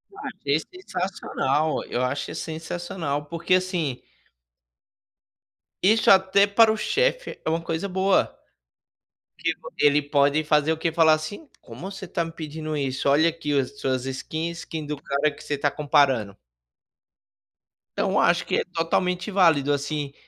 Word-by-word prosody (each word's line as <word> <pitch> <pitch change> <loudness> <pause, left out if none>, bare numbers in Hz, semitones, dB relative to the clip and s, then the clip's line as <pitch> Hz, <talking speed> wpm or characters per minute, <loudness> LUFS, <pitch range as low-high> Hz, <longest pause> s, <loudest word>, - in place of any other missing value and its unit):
Achei 145 - -2
sensacional, 175 - -2
eu 120 - -2
acho 135 +3 -2
sensacional, 160 -2 -4
porque 170 +4 0
assim 175 -8 -1 1.8
Isso 220 +4 +4
até 190 +1 +5
para 220 +2 +5
o 220 - -1
chefe - - 0
é - - +1
uma 165 +1 0
coisa 165 +3 -3
boa, 190 +1 +1 1.0
tipo, - - -4
ele 145 0 +4
pode 145 +1 +2
fazer 150 +1 +3
o - - -2
quê? 165 0 -1
Falar 160 -1 +5
assim: 155 - -6
"Como 190 - -9
você 195 -1 -8
está 170 -2 -2
me 165 - -7
pedindo 155 -1 -5
isso? 135 -1 -1
Olha 150 +4 +5
aqui 155 -3 -1
as 140 +1 -3
suas 130 -1 -1
skin, 155 +5 -3
skin 160 -2 -6
do 150 -1 -5
cara 140 +2 +1
que - - -13
você 150 - -3
está 145 0 0
comparando." 135 -9 +2 1.6
Então - - +1
acho - - +3
que - - 0
é - - +1
totalmente 180 +2 -1
válido, 160 -7 +4
assim, 145 0 -3
160 Hz, 145 wpm, -24 LUFS, 145-180 Hz, 1.8 s, até